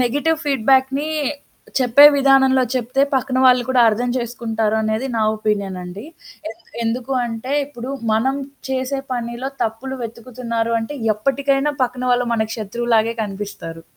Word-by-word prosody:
Negative 290 +6 +1
ఫీడ్‌‌‌బ్యాక్‌ని 270 +1 +2 0.7
చెప్పే 255 +3 +6
విధానంలో 265 -1 +4
చెప్తే 255 +2 0
పక్కన 260 0 0
వాళ్ళు 250 -1 +6
కూడా 260 -1 +3
అర్థం 240 +3 0
చేసుకుంటారనేది 220 -1 -1
నా 220 - +1
ఒపీనియన్ 200 -3 -2
అండి. 180 +5 -8 0.5
ఎన్ 225 +1 -13 0.2
ఎందుకు 240 +3 -2
అంటే 230 +3 -5
ఇప్పుడు 255 -2 -8 0.2
మనం 260 +5 +1 0.3
చేసే 265 +1 -1
పనిలో 240 +2 -4
తప్పులు 240 +4 -3
వెతుకుతున్నారు 230 0 -4
అంటే 260 +6 -5 0.2
ఎప్పటికైనా 275 +5 0
పక్కన 250 0 -2
వాళ్ళు 245 0 +1
మనకు 220 -1 -1
శత్రువులాగే 230 +1 0
కనిపిస్తారు. 195 -5 -6
240 Hz, 125 wpm, -20 LUFS, 220-265 Hz, 0.7 s, చెప్పే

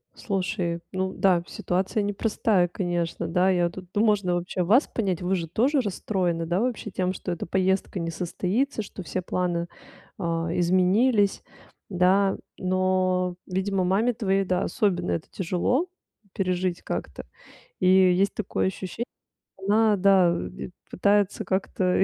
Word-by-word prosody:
Слушай, 180 -4 -2
ну 190 0 -2
да, 180 -3 +2
ситуация 195 +5 -1
непростая, 205 -2 +1
конечно, 175 -2 -2
да. 180 +3 +2
Я 175 -2 +2
тут 185 +2 -10
ну, 210 - +3
можно 200 -4 +2
вообще 180 +1 -2
вас 225 - +4
понять? 190 -6 -2
Вы 185 +2 +1
же 170 -3 -3
тоже 255 - +2
расстроены, 180 -5 -1
да, 175 +3 0
вообще 235 -3 -2
тем, 185 0 -1
что 180 - -5
эта 175 - -4
поездка 190 +1 0
не 165 0 -3
состоится, 195 - -1
что 195 -2 -8
все 185 +2 -3
планы, 175 -1 -1 0.5
а, 165 -3 -2
изменились, 195 +5 +3 0.5
да. 190 +1 +3 0.2
Но, 185 -1 +1
видимо, 190 +1 -1
маме 205 +7 +2
твоей, 195 -3 +1
да, 180 0 0
особенно 185 -6 0
это 165 - -2
тяжело 195 - 0 0.5
пережить 185 -2 -1
как-то. - - -5 0.5
И 185 - +2
есть 185 +1 +4
такое 200 -2 -1
ощущение, 190 +4 -4 0.5
что 190 - -9
она, 215 +1 +4
да, 190 -2 +5
э, - - -3
де - - -8 0.2
пытается 200 +1 +1
как-то 190 -1 +1
185 Hz, 145 wpm, -25 LUFS, 180-200 Hz, 0.5 s, да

